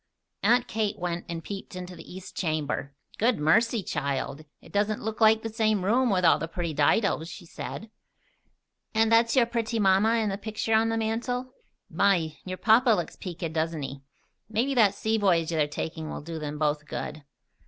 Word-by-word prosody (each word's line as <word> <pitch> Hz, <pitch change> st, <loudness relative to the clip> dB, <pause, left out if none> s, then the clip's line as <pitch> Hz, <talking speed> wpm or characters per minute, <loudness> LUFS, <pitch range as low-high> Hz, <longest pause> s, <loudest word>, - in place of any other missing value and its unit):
Aunt 240 Hz, +1 st, +3 dB
Kate 215 Hz, -1 st, -1 dB
went 175 Hz, -2 st, -3 dB
and 165 Hz, -1 st, -5 dB
peeped 195 Hz, -1 st, -7 dB
into 180 Hz, 0 st, -7 dB
the -, -, -12 dB
east 185 Hz, +1 st, -10 dB
chamber. 150 Hz, -4 st, -2 dB, 0.2 s
"Good 235 Hz, +2 st, +3 dB
mercy, 220 Hz, +8 st, +3 dB
child! 140 Hz, 0 st, -3 dB
It -, -, -17 dB
doesn't 205 Hz, +1 st, 0 dB
look 220 Hz, +1 st, -4 dB
like 220 Hz, 0 st, +5 dB
the 225 Hz, -1 st, -5 dB
same 215 Hz, -4 st, +1 dB
room, 245 Hz, +5 st, +3 dB
with 185 Hz, -3 st, +2 dB
all 165 Hz, -, +5 dB
the 165 Hz, -, -3 dB
pretty 170 Hz, -1 st, -3 dB
didos," 160 Hz, +3 st, +2 dB
she 175 Hz, +2 st, -10 dB
said. 215 Hz, +5 st, -7 dB, 1.0 s
"And 225 Hz, 0 st, +3 dB
that's 230 Hz, +1 st, +4 dB
your 250 Hz, -3 st, +5 dB
pretty 230 Hz, -1 st, -2 dB
mamma 205 Hz, +2 st, +4 dB
in 220 Hz, -2 st, +1 dB
the 195 Hz, 0 st, -3 dB
picture 220 Hz, +1 st, -2 dB
on 220 Hz, +1 st, +4 dB
the 225 Hz, -, 0 dB
mantel? 245 Hz, +3 st, -2 dB, 0.3 s
My! 175 Hz, -6 st, +2 dB
Your 185 Hz, 0 st, -4 dB
papa 235 Hz, +5 st, +4 dB
looks 205 Hz, -7 st, +1 dB
peaked, 170 Hz, -3 st, -5 dB
doesn't 160 Hz, -1 st, -1 dB
he? 135 Hz, 0 st, -6 dB, 0.5 s
Maybe 235 Hz, +6 st, 0 dB
that 210 Hz, -6 st, +4 dB
sea 220 Hz, +1 st, 0 dB
voyage 175 Hz, -5 st, +2 dB
they 160 Hz, -3 st, +2 dB
are -, -, -2 dB
taking 155 Hz, +1 st, -5 dB
will -, -, -5 dB
do 160 Hz, +1 st, -6 dB
'em 150 Hz, 0 st, -4 dB
both 150 Hz, 0 st, 0 dB
good." 150 Hz, +1 st, -5 dB
200 Hz, 190 wpm, -27 LUFS, 165-225 Hz, 1.0 s, like